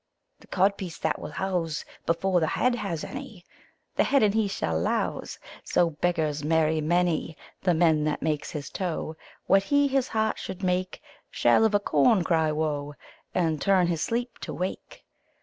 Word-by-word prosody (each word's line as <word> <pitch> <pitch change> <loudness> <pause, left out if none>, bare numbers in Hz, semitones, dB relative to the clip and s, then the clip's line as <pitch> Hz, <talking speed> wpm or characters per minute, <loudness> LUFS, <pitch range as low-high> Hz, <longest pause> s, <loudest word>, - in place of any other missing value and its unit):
The - - -19
codpiece 190 -3 0
that - - 0
will - - -6
house 175 -5 -2 0.2
Before 180 +2 +2
the 160 - +1
head 250 +8 +1
has 195 -9 -3
any, 255 -10 -8 0.5
The - - +5
head 275 -3 +3
and 205 -1 +3
he 220 -1 +2
shall 80 - -1
louse: 85 - -2 0.3
So 170 -1 +2
beggars 155 -2 -1
marry 160 0 +2
many. 170 0 0 0.2
The 180 -3 +2
man 160 -2 +3
that 150 -1 -1
makes 155 -2 -1
his 145 -3 -6
toe 165 -3 -3 0.3
What 195 - +5
he 285 +3 +3
his 270 -2 +1
heart 220 0 0
should 190 +1 -7
make 185 0 -1 0.3
Shall 225 - +3
of 215 -2 +2
a - - +5
corn 185 - +3
cry 160 -2 +2
woe, 150 -2 -2 0.4
And 160 -4 +1
turn 190 0 +4
his 170 -2 -1
sleep 235 +4 -2
to - - -6
wake. 185 +2 -5
175 Hz, 170 wpm, -26 LUFS, 155-200 Hz, 0.5 s, The